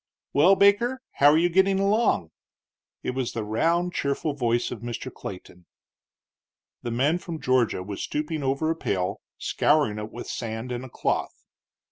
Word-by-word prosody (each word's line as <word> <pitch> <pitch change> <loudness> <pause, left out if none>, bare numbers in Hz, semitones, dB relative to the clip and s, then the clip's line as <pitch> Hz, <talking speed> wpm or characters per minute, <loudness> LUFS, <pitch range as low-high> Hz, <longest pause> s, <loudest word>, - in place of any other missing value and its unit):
"Well, 170 +8 +6
Baker, 205 +7 +3
how 145 - +5
are 150 - +5
you 170 +2 +4
getting 190 +2 +3
along?" 200 - +2 0.7
It - - -1
was 130 -1 -3
the 115 - -3
round, 165 +12 +1
cheerful 140 +2 -1
voice 120 -3 0
of - - -5
Mr. 120 +2 -6
Clayton. 90 -2 -9 1.1
The 120 - -4
man 140 +9 +1
from 170 -3 -6
Georgia 125 -8 +1
was 100 +1 -6
stooping 150 +1 -3
over 140 +4 0
a - - -1
pail, 100 - -2 0.2
scouring 145 -9 +1
it 105 +1 -6
with 120 - -7
sand 115 +1 -4
and 125 +1 -3
a 130 - -9
cloth. - - -2
135 Hz, 160 wpm, -25 LUFS, 115-170 Hz, 1.1 s, Well